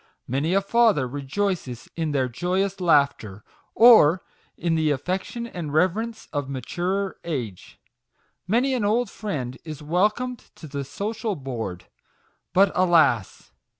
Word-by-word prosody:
Many 145 +8 0
a 195 - +4
father 210 - +3
rejoices 140 - -3
in 160 -2 -2
their 135 -3 +1
joyous 185 +9 -1
laughter, 140 - +2 0.3
or 205 -8 +7 0.3
in 170 0 0
the 160 -1 +2
affection 185 - -2
and 175 -10 -6
reverence 200 +9 0
of 145 -2 -2
maturer 180 +8 -2
age. 125 - -5 0.7
Many 245 +7 +2
an 245 -4 0
old 220 +2 +1
friend 130 - -5
is 155 -2 -8
welcomed 210 +10 0
to - - -11
the 140 -1 -4
social 210 - -3
board. 115 - -5 0.7
But, 190 +1 +4
alas 160 - +2
170 Hz, 125 wpm, -24 LUFS, 140-200 Hz, 0.7 s, or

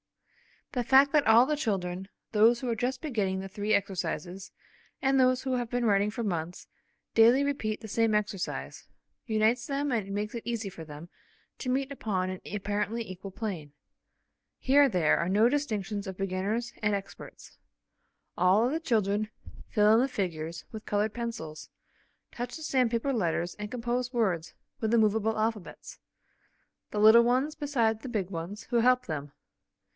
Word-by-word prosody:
The 250 -3 -1
fact 270 +2 +6
that 300 -5 +3
all 225 +3 +7
the 300 +2 -1
children, 190 -8 -2 0.2
those 225 +2 +5
who 255 - -2
are 230 - 0
just 250 +3 -2
beginning 205 -11 -1
the 195 - -7
three 210 +2 -1
exercises 190 -1 -2 0.5
and 270 0 +3
those 255 0 +3
who 260 -1 0
have 240 -2 -3
been 245 0 -1
writing 205 -1 +3
for 225 +2 -4
months, 175 -4 -3 0.5
daily 235 +5 +6
repeat 245 -7 -2
the 220 - -8
same 225 +1 +2
exercise, 210 -3 -3 0.4
unites 225 +2 +2
them 280 0 -1
and 210 -5 -1
makes 210 +1 -3
it 235 - -5
easy 230 -4 -3
for 165 -3 -10
them 150 +3 -10 0.5
to 255 - -4
meet 270 +2 0
upon 190 -8 -2
an 185 -1 -5
apparently 210 +3 -2
equal 185 +1 -8
plane. 185 -9 -5 0.8
Here 280 +2 +5
there 175 -8 +3
are 170 - -1
no 215 +5 +4
distinctions 215 -8 -2
of 190 -1 -6
beginners, 195 +5 -2
and 210 -1 +2
experts. 195 0 -9 0.8
All 190 +5 +4
of 250 - 0
the 320 - -1
children 215 -7 0 0.4
fill 210 0 +4
in 225 - +5
the 260 - +3
figures 170 -8 -4
with 220 -1 -8
coloured 210 +1 0
pencils, 225 -11 -6 0.6
touch 245 0 -5
the 315 - -8
sandpaper 255 -2 +1
letters 175 -5 -1
and 210 0 -6
compose 245 +1 -2
words 185 -9 0 0.3
with 220 - -1
the 235 - +4
movable 220 0 +2
alphabets; 215 -3 -4 0.9
the 210 - -2
little 220 +2 +8
ones 255 +5 +1
beside 235 -7 0
the 260 - -6
big 205 -6 -2
ones 175 +5 -6
who 240 - +3
help 250 +1 +3
them. 145 -3 -5
220 Hz, 165 wpm, -29 LUFS, 195-245 Hz, 0.9 s, little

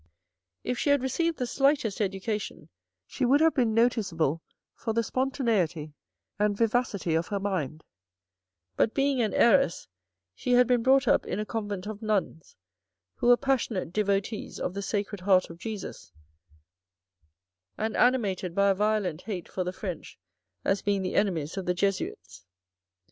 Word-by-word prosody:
If 250 - -2
she - - 0
had 285 -2 +3
received 330 +5 0
the 250 - -1
slightest 270 -5 +1
education, 195 -4 -3 0.4
she - - -5
would 265 +4 +4
have 320 0 +4
been 235 -5 +1
noticeable 190 - +1 0.3
for 225 - -4
the 230 +1 +1
spontaneity 220 - -1 0.5
and 210 -1 +1
vivacity 225 -6 0
of 165 +1 0
her 200 - -2
mind, 165 -7 -3 0.9
but 225 - +1
being 275 -2 +2
an 220 - +1
heiress, 235 -4 +3 0.5
she 245 - -1
had 250 0 +6
been 245 -1 +2
brought 265 +2 +4
up - - +3
in 185 - -2
a 215 - -2
Convent 205 -3 -4
of 210 0 -6
Nuns, 205 -7 -2 0.6
who - - 0
were 245 0 +7
passionate 235 - -1
devotees 205 +1 -1
of 180 - -2
the 200 - -4
Sacred 205 -1 -3
Heart 185 -2 +3
of 165 - -12
Jesus 195 - -7 1.7
and 220 0 -2
animated 200 -8 +1
by 200 0 +4
a - - +3
violent 205 -5 0
hate 190 -5 -5
for 185 - -3
the 180 - -3
French 185 -3 -7 0.5
as 195 0 +1
being 200 -1 0
the 185 - -3
enemies 170 -4 0
of 190 - -4
the 180 - +1
Jesuits. 185 - -3
205 Hz, 155 wpm, -28 LUFS, 185-240 Hz, 1.7 s, were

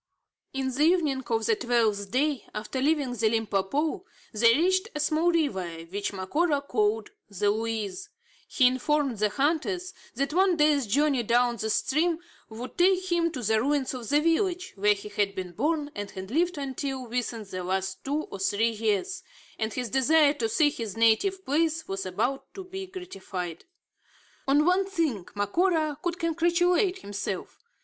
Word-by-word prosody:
In 265 -1 -2
the 275 - -2
evening 305 -5 +3
of 225 -1 0
the 225 - +3
twelfth 220 -4 +1
day 275 +2 0
after 220 +5 -3
leaving 285 -3 +1
the 220 -2 +1
Limpopo, 225 - 0 0.3
they 230 +2 +5
reached 375 +5 +2
a - - -2
small 315 +3 +2
river, 275 - 0 0.2
which 205 +1 -2
Macora 285 - 0
called 425 +8 0 0.2
the 205 +1 +1
Luize. 225 - -3 0.4
He 260 - +3
informed 260 -1 +1
the 210 0 +2
hunters, 335 - -1 0.2
that 275 +4 -1
one 370 0 +3
day's 295 -5 +3
journey 280 +3 +2
down 240 +1 +2
this 220 0 0
stream 320 +4 +1 0.3
would 235 +8 -8
take 370 0 +3
him 335 -1 +2
to 255 -5 -5
the 220 0 +2
ruins 280 0 0
of 245 -4 -6
the 290 - +4
village 360 +3 0
where 205 +1 +3
he 200 +1 -9
had 205 -1 -1
been 185 -1 -5
born 295 - -1
and 205 -1 -5
had 190 +2 -8
lived 345 +4 +1
until 270 -1 -4
within 235 -1 -3
the 185 -2 -6
last 190 +1 -2
two 290 +3 -1
or 195 - -9
three 210 +4 +1
years, 225 - -1 0.4
and 220 -1 -1
his 245 -4 -3
desire 285 +2 +4
to 230 -6 -2
see 295 +5 +3
his 225 -6 -6
native 370 - +3
place 320 +3 0
was 195 0 -3
about 250 +9 -2
to 385 - -6
be 380 +1 -7
gratified. 190 - -7 0.8
On 290 +3 +4
one 370 +2 +3
thing 310 - -1
Macora 310 - +1
could 350 -1 -2
congratulate 350 +3 +1
himself. 200 -1 -5
270 Hz, 165 wpm, -27 LUFS, 215-330 Hz, 0.8 s, they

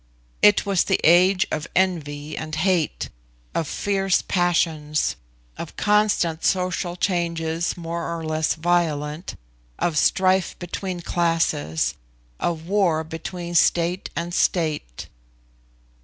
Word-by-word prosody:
It 210 -1 +5
was 195 -3 +2
the - - +1
age 180 +3 +5
of 150 - -2
envy 155 -5 -1
and 155 -1 -5
hate, 175 -1 0 0.4
of 160 - -1
fierce 195 +1 0
passions, 165 -4 +1 0.4
of - - -7
constant 205 -6 +2
social 180 -1 0
changes 170 -3 -1
more 170 0 -4
or 165 - -6
less 155 0 0
violent, 160 -1 -1 0.4
of 155 -4 +1
strife 185 +2 +2
between 180 0 -5
classes, 165 - 0 0.5
of 165 -2 -2
war 180 -4 +2
between 170 +2 -6
state 175 +2 +2
and 170 +1 -3
state. 155 - -1
170 Hz, 110 wpm, -23 LUFS, 160-180 Hz, 0.5 s, It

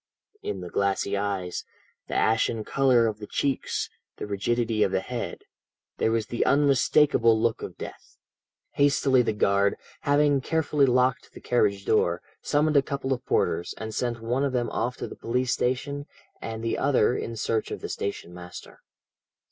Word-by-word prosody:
In 100 -3 -4
the 90 -1 -7
glassy 100 0 0
eyes, 100 -3 -2 0.4
the - - -4
ashen 110 0 +2
colour 130 -1 +3
of 110 -2 -2
the 105 - -8
cheeks, 140 +4 -1 0.3
the - - -4
rigidity 110 +2 0
of 100 -3 +3
the 95 - +1
head, 120 +4 -5 0.6
there - - +2
was 115 -1 0
the 120 +2 -1
unmistakable 140 -4 +4
look 115 0 0
of - - -7
death. - - -10 0.5
"Hastily 140 -2 +3
the 120 - 0
guard, 100 -1 +2 0.2
having 145 -1 +3
carefully 150 -2 +2
locked 125 +1 +1
the - - -10
carriage 100 -5 +1
door, - - +2 0.2
summoned 150 0 +2
a - - +7
couple 135 -1 -2
of 125 - -5
porters, 85 +1 0
and 110 0 -6
sent 120 -1 -2
one 125 +4 0
of 140 -2 0
them 120 -1 0
off 125 +2 -2
to - - -4
the - - -9
police 125 +2 -1
station, 140 +3 -2 0.3
and 115 0 -5
the 115 - -1
other 125 -3 +3
in 115 - -4
search 110 0 -1
of - - -5
the - - -4
station 95 -3 -4
master. 90 0 -11
115 Hz, 170 wpm, -26 LUFS, 105-135 Hz, 0.6 s, a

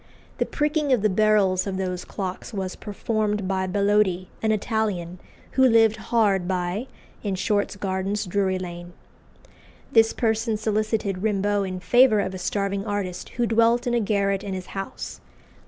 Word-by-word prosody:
The - - +1
pricking 300 -1 0
of 245 -5 +3
the 215 - +3
barrels 200 -2 +3
of 190 -1 -2
those 180 -1 -3
clocks 190 +3 -5
was 190 -2 -3
performed 210 -1 -2
by 190 -1 0
Bellodi, 200 -2 +1
an 220 - +2
Italian, 205 -5 -1 0.3
who 265 - +3
lived 225 -3 +5
hard 205 -6 +2
by, 185 +6 -2 0.3
in 200 -3 -2
Short's 200 +2 0
Gardens, 195 +1 -2
Drury 190 0 0
Lane. 175 -1 -7 1.0
This 225 -1 +5
person 225 -1 0
solicited 215 -2 -1
Rimbault 205 -1 +1
in 185 0 -4
favour 240 0 +5
of 190 -1 -1
a 185 - -6
starving 200 +2 -1
artist 200 -4 -3
who 240 - +2
dwelt 230 +1 +3
in 245 - 0
a 240 - +3
garret 200 -2 0
in 195 -2 -4
his 185 -1 -6
house. 65 - -6
200 Hz, 155 wpm, -24 LUFS, 190-220 Hz, 1.0 s, lived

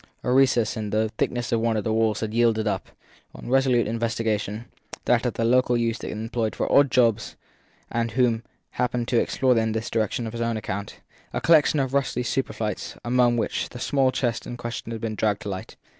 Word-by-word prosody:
A 125 - 0
recess 130 -4 +3
in 110 -2 -4
the 110 +1 +1
thickness 120 -2 -1
of 115 - +2
one 115 -1 +1
of 105 - -1
the 110 - 0
walls 110 -2 +1
had 110 -1 -3
yielded 115 -2 +2
up, 95 -3 -2 0.5
on - - -10
resolute 130 -3 +3
investigation 110 -1 -2 0.4
that 125 0 +3
of 120 - -3
the 115 - 0
local 125 0 +3
youth 115 -1 -1
employed 110 +1 -3
for - - -2
odd 140 -1 +5
jobs 115 -4 +2 0.6
and 115 0 0
who 125 +3 +1
had 115 0 -4 0.3
happened 125 -1 -1
to 120 - +3
explore 130 -1 +2
in 110 -1 0
this 110 +1 -3
direction 110 +1 -1
on 110 - -4
his 115 0 -5
own 115 -1 0
account 100 -1 -5 0.3
a - - -1
collection 155 -2 +4
of 135 -1 -1
rusty 135 -3 0
superfluities 115 -3 -3
among 120 0 +3
which 115 - -1
the 125 - -9
small 135 0 +2
chest 120 -3 -2
in 120 - -6
question 120 -1 -5
had 115 -1 -5
been 115 -1 -2
dragged 105 -1 0
to 105 - -4
light. 95 -1 -6
115 Hz, 205 wpm, -25 LUFS, 110-125 Hz, 0.6 s, odd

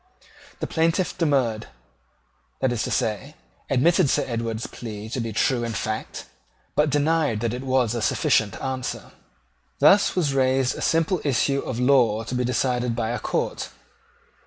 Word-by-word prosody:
The - - 0
plaintiff 165 +3 0
demurred, 130 -9 0 0.9
that 130 -2 +1
is 120 -2 -1
to - - -3
say, 120 +8 -2 0.3
admitted 160 +4 +3
Sir - - +2
Edward's 115 -2 -3
plea 110 -2 -8
to 130 - -3
be 115 -1 -3
true 120 +3 +1
in 115 -1 -3
fact, 110 +1 -4 0.5
but 150 0 +3
denied 150 -4 +1
that 115 -1 -1
it 125 - -4
was 130 -4 +1
a 120 - -2
sufficient 105 -1 +1
answer. 130 -1 -4 0.7
Thus 205 +1 +5
was 155 -7 +1
raised 130 -1 +2
a - - -7
simple 165 +2 +1
issue 140 0 +1
of 125 -3 -4
law 125 -4 +3
to 115 - -6
be 125 0 0
decided 125 -1 0
by 115 -1 -1
the 120 - -2
court. - - -2
125 Hz, 160 wpm, -24 LUFS, 115-140 Hz, 0.9 s, Thus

